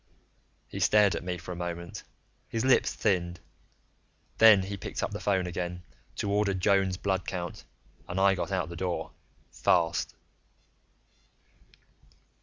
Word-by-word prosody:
He -, -, -7 dB
stared 105 Hz, -2 st, +4 dB
at -, -, -4 dB
me 90 Hz, 0 st, -3 dB
for 90 Hz, +1 st, -8 dB
a -, -, -4 dB
moment, 85 Hz, 0 st, -5 dB, 0.5 s
his 115 Hz, +2 st, -1 dB
lips 130 Hz, -, +4 dB
thinned. 85 Hz, -2 st, 0 dB, 1.0 s
Then 110 Hz, -4 st, +8 dB
he 100 Hz, +1 st, -4 dB
picked 100 Hz, -, -5 dB
up -, -, -1 dB
the -, -, -5 dB
phone 95 Hz, -3 st, +1 dB
again 90 Hz, 0 st, -4 dB, 0.3 s
to 100 Hz, -, -2 dB
order 100 Hz, -1 st, +1 dB
Joan's 95 Hz, 0 st, +2 dB
blood 95 Hz, -1 st, -1 dB
count, 90 Hz, -2 st, -5 dB, 0.4 s
and 90 Hz, -, -2 dB
I 100 Hz, 0 st, +5 dB
got 95 Hz, +1 st, -3 dB
out 90 Hz, -4 st, -1 dB
the 85 Hz, -, -7 dB
door, 90 Hz, +1 st, -3 dB, 0.4 s
fast. 85 Hz, -1 st, +1 dB
95 Hz, 140 wpm, -29 LUFS, 90-100 Hz, 1.0 s, Then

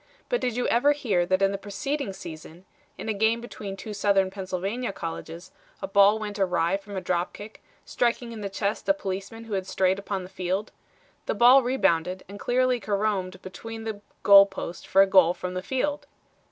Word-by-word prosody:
But -, -, 0 dB
did 245 Hz, -3 st, -1 dB
you 245 Hz, -, -1 dB
ever 285 Hz, +5 st, +4 dB
hear 200 Hz, -12 st, 0 dB
that 185 Hz, +1 st, +2 dB
in 195 Hz, -, +4 dB
the 195 Hz, -, -4 dB
preceding 260 Hz, +5 st, -3 dB
season, 170 Hz, -1 st, -10 dB, 0.3 s
in -, -, -7 dB
a 220 Hz, -, 0 dB
game 220 Hz, +3 st, +2 dB
between 205 Hz, -4 st, -7 dB
two 210 Hz, +2 st, -7 dB
Southern 195 Hz, -2 st, +2 dB
Pennsylvania 195 Hz, +5 st, -3 dB
colleges, 165 Hz, 0 st, -7 dB, 0.3 s
a -, -, -4 dB
ball 200 Hz, +2 st, +5 dB
went 210 Hz, -1 st, -5 dB
awry 180 Hz, -2 st, +1 dB
from 200 Hz, 0 st, -9 dB
a -, -, -2 dB
drop 180 Hz, 0 st, -1 dB
kick, 210 Hz, +1 st, -11 dB, 0.2 s
striking 240 Hz, 0 st, -1 dB
in 225 Hz, -2 st, -7 dB
the 200 Hz, -, -3 dB
chest 200 Hz, +5 st, -2 dB
a 295 Hz, -, +5 dB
policeman 200 Hz, -2 st, -5 dB
who 225 Hz, -2 st, -7 dB
had 190 Hz, -1 st, -2 dB
strayed 190 Hz, +1 st, +1 dB
upon 200 Hz, -1 st, -4 dB
the -, -, -8 dB
field? 190 Hz, +2 st, -3 dB, 0.6 s
The -, -, 0 dB
ball 250 Hz, +3 st, +7 dB
rebounded 185 Hz, -8 st, 0 dB
and 200 Hz, +2 st, -10 dB
cleanly 250 Hz, +1 st, +1 dB
caromed 200 Hz, -3 st, -2 dB
between 225 Hz, +4 st, -8 dB
the 220 Hz, -2 st, -5 dB, 0.2 s
goal 200 Hz, 0 st, +9 dB
post 190 Hz, -3 st, -7 dB
for 195 Hz, -, +6 dB
a -, -, +1 dB
goal 185 Hz, -3 st, +5 dB
from 180 Hz, 0 st, -5 dB
the 185 Hz, -, -3 dB
field. 280 Hz, +7 st, -2 dB
200 Hz, 195 wpm, -26 LUFS, 185-225 Hz, 0.6 s, goal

